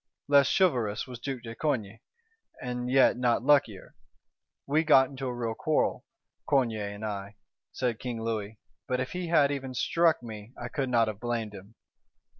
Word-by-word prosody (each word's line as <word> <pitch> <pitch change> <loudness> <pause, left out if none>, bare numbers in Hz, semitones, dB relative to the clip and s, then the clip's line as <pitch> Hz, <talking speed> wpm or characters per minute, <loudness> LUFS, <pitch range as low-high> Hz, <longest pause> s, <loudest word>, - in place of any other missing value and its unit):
Less 140 -1 +5
chivalrous 125 - +1
was 125 -3 -9
Duke 130 -1 -5
de 115 -1 -7
Coigny, 115 -6 -2 0.6
and 125 0 -4
yet 135 -1 +5
not 120 -2 +1
luckier: 135 -9 +2 0.7
'We 150 +3 +2
got 135 -4 +6
into 135 -1 -5
a - - -2
real 115 -2 -2
quarrel, 155 +6 0 0.4
Coigny 120 -6 +2
and 100 +1 -5
I,' 100 -1 -5 0.4
said 120 -3 -2
King 120 -3 -4
Louis; 110 -2 -3 0.3
'but 125 0 0
if 130 - -3
he 180 -1 -4
had 150 -4 +4
even 135 -2 -4
struck 165 +3 +2
me, 110 0 -9
I 120 - -5
could 135 0 -2
not 115 -2 +3
have 105 -2 -4
blamed 115 -3 -3
him. 100 +3 -12
125 Hz, 170 wpm, -28 LUFS, 110-135 Hz, 0.7 s, got